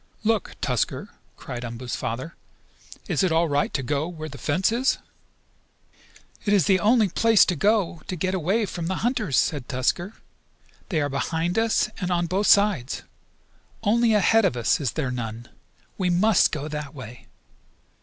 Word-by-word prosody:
"Look, 220 Hz, -2 st, 0 dB
Tusker!" -, -, -1 dB, 0.3 s
cried 120 Hz, -1 st, -7 dB
Umboo's 120 Hz, +1 st, -5 dB
father. 130 Hz, +9 st, -4 dB, 0.7 s
"Is -, -, 0 dB
it 185 Hz, -3 st, +2 dB
all 165 Hz, +1 st, +3 dB
right 145 Hz, -1 st, 0 dB
to 135 Hz, -, -1 dB
go 145 Hz, +5 st, -1 dB
there 175 Hz, -, -10 dB
where 155 Hz, 0 st, -6 dB
the 140 Hz, -, -10 dB
fence 180 Hz, +8 st, +1 dB
is?" 250 Hz, +3 st, +1 dB, 1.5 s
"It 205 Hz, -, +1 dB
is 190 Hz, -7 st, +3 dB
the 190 Hz, -2 st, +3 dB
only 220 Hz, +1 st, +4 dB
place 225 Hz, +3 st, +4 dB
to 180 Hz, -, 0 dB
go 195 Hz, -1 st, +1 dB
to 185 Hz, -, -3 dB
get 185 Hz, +2 st, -1 dB
away 190 Hz, +5 st, +1 dB
from 170 Hz, -3 st, -5 dB
the 190 Hz, -, -1 dB
hunters," 230 Hz, -, 0 dB
said 145 Hz, -5 st, 0 dB
Tusker. 155 Hz, -, -1 dB, 0.8 s
"They 160 Hz, -5 st, 0 dB
are 145 Hz, -, 0 dB
behind 165 Hz, +7 st, -1 dB
us 225 Hz, -1 st, +2 dB
and 180 Hz, -2 st, -2 dB
on 175 Hz, -1 st, +1 dB
both 190 Hz, +4 st, 0 dB
sides. 200 Hz, -, +3 dB, 0.8 s
Only 225 Hz, +1 st, +3 dB
ahead 220 Hz, +2 st, +4 dB
of 160 Hz, -10 st, +1 dB
us 115 Hz, -1 st, +2 dB
is 135 Hz, -, -1 dB
there 135 Hz, -5 st, -2 dB
none. 115 Hz, -1 st, -5 dB, 0.5 s
We 185 Hz, -2 st, +1 dB
must 205 Hz, +5 st, +4 dB
go 150 Hz, -1 st, -4 dB
that 150 Hz, -1 st, -6 dB
way!" 125 Hz, -2 st, -10 dB
170 Hz, 170 wpm, -24 LUFS, 140-205 Hz, 1.5 s, only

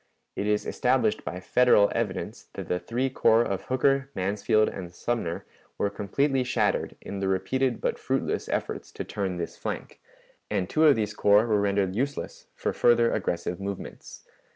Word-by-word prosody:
It 100 Hz, -, -2 dB
is 105 Hz, 0 st, +1 dB
established 125 Hz, -4 st, +1 dB
by 90 Hz, -, -5 dB
Federal 105 Hz, 0 st, +4 dB
evidence -, -, -3 dB
that -, -, -6 dB
the 90 Hz, -, 0 dB
three 120 Hz, +9 st, -1 dB
corps 115 Hz, -2 st, +4 dB
of 95 Hz, -4 st, -3 dB
Hooker, 135 Hz, +1 st, +2 dB
Mansfield, 105 Hz, +3 st, +2 dB
and 90 Hz, -3 st, -6 dB
Sumner 90 Hz, -3 st, -3 dB, 0.3 s
were 100 Hz, -, 0 dB
completely 130 Hz, +7 st, 0 dB
shattered 120 Hz, -4 st, 0 dB
in 100 Hz, -, -6 dB
the 95 Hz, -, -1 dB
repeated 125 Hz, +6 st, 0 dB
but -, -, -1 dB
fruitless -, -, -1 dB
efforts -, -, -3 dB
to -, -, -4 dB
turn 95 Hz, -3 st, -3 dB
this 85 Hz, -, -5 dB
flank, -, -, -6 dB, 0.5 s
and 90 Hz, -, 0 dB
two 155 Hz, +8 st, +3 dB
of 150 Hz, -, +7 dB
these 105 Hz, -2 st, -1 dB
corps 105 Hz, +1 st, +4 dB
were 105 Hz, -3 st, +2 dB
rendered 100 Hz, -2 st, +1 dB
useless 140 Hz, +5 st, -3 dB
for -, -, -2 dB
further 120 Hz, -1 st, +4 dB
aggressive 85 Hz, 0 st, -2 dB
movements. 100 Hz, 0 st, -7 dB
105 Hz, 165 wpm, -27 LUFS, 95-125 Hz, 0.5 s, of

